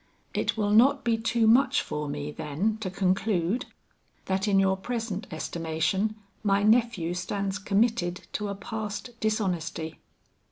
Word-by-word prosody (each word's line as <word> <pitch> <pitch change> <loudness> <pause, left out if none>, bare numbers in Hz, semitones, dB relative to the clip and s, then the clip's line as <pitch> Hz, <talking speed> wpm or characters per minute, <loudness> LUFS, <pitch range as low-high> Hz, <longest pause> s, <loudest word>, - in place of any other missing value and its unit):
"It - - 0
will 205 -1 +1
not 270 +6 +5
be 235 -1 +2
too 225 0 +1
much 260 +5 +5
for 150 -1 -4
me, 145 +1 -4
then, 160 +10 -1
to 190 - -2
conclude, 190 +2 0 0.6
that 190 +2 0
in 200 -1 +3
your 190 0 +3
present 225 -1 -4
estimation 165 +6 -1 0.3
my 200 -1 +2
nephew 215 -6 +3
stands 195 +2 -2
committed 200 -3 +1
to 210 - -2
a 200 - -3
past 210 +2 -5
dishonesty?" 180 -7 -2
200 Hz, 135 wpm, -27 LUFS, 180-225 Hz, 0.6 s, not